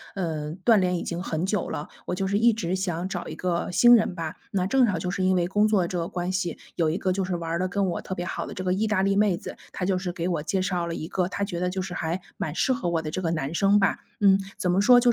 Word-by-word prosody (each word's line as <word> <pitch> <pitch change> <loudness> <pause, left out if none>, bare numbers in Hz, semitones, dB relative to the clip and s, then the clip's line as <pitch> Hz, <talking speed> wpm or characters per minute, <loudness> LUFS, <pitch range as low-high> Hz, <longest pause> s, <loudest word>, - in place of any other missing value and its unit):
呃， 155 -5 -3
断 225 -4 +6
联 180 -1 +1
已 - - -4
经 170 0 -4
很 165 -2 -2
久 195 0 -1
了， 145 - -4 0.2
我 180 - -1
就 195 - -1
是 200 +2 +1
一 235 +1 +6
直 185 -5 -2
想 180 -2 -2
找 180 -2 -4
一 - - -6
个 175 -2 -1
新 240 +6 +7
人 215 -5 +1
吧。 165 -3 -4 0.2
那 185 -2 0
正 255 +5 +4
好 195 -5 0
就 180 +2 -2
是 190 0 -1
因 185 0 +3
为 175 -1 +2
工 205 +3 +3
作 200 -5 +2
这 180 0 -2
个 165 - -2
关 180 0 -3
系， 185 -2 -2 0.2
有 165 -2 +2
一 160 - -1
个 185 - 0
就 190 +1 -1
是 180 -1 -2
玩 170 0 -2
得 185 - +1
跟 195 +2 0
我 175 -3 -2
特 190 - -5
别 175 - -4
好 - - -4
的 - - -8
这 185 - -4
个 180 0 +1
意 210 +4 0
大 210 -3 +1
利 195 0 +2
妹 200 -3 +3
子， - - -8 0.2
她 180 - -3
就 190 0 +1
是 180 -1 -3
给 175 0 -3
我 170 -5 -1
介 190 +4 0
绍 180 -2 -1
了 165 - -3
一 155 - -5
个 180 0 0
她 200 +2 -3
觉 190 -4 -3
得 180 0 0
就 190 +1 -3
是 185 -1 -6
还 170 +1 -2 0.2
蛮 155 - -3
适 260 - +2
合 190 -9 -2
我 165 -1 0
的 155 - -4
这 185 - -3
个 170 - 0
男 155 -2 -2
生 195 +4 +4
吧。 195 - +2 0.2
嗯， 195 -1 +5 0.2
怎 180 - 0
么 185 +2 +3
说， 245 +3 +7
185 Hz, 330 characters per minute, -26 LUFS, 170-195 Hz, 0.2 s, 新